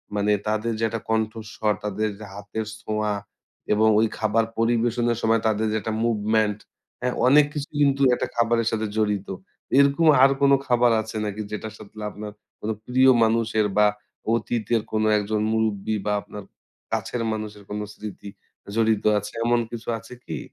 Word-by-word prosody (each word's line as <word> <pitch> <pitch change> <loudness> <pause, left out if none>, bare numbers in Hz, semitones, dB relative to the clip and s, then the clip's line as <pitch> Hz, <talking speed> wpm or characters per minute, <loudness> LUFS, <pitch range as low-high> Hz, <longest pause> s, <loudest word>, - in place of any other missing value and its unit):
মানে 105 +1 +1 0.2
তাদের 110 +2 0
যে, - - -1
একটা 115 0 -4
কণ্ঠস্বর, 110 -1 -1
তাদের 105 +1 -1
যে, 110 - -8
হাতের 100 +2 -5 0.2
ছোঁয়া 105 -1 -1 0.6
এবং 110 +1 +3
ওই 115 - +4
খাবার 110 +1 +1
পরিবেশনের 120 0 +1
সময় 115 0 +2
তাদের 110 0 +1
যে, - - -1
একটা 110 - -3
মুভমেন্ট, 110 -2 +1 0.4
হ্যাঁ? 125 - 0
অনেক 145 +3 +7
কিছু 145 -1 -4
কিন্তু 140 -1 +3
একটা - - -2
খাবারের 115 -1 +2
সাথে 110 -1 -1
জড়িত। 105 -2 0 0.5
এরকম 140 +4 +4 0.2
আর 135 - +8
কোন 140 0 +5 0.2
খাবার 120 -1 +4
আছে 110 0 -9
নাকি 105 +1 -4
যেটার 110 0 -5
সাথে 100 - -14 0.2
আপনার 105 0 -7 0.3
কোন 110 - -4 0.2
প্রিয় 130 +1 +4
মানুষের 110 -1 +2
বা 105 0 +6 0.5
অতীতের 115 0 0
কোনো 110 0 +1
একজন 105 +1 -1
মুরুব্বি 110 -1 0
বা 105 - 0
আপনার 105 0 -9 0.5
কাছের 110 +2 -2
মানুষের 105 -1 -5
কোন 105 0 -3
স্মৃতি 105 -1 -8 0.5
জড়িত 110 -2 +2 0.2
আছে? 105 - -8
এমন 120 0 +3
কিছু 120 0 -7
আছে 115 +3 -13
কি? - - -4
110 Hz, 160 wpm, -24 LUFS, 105-115 Hz, 0.6 s, আর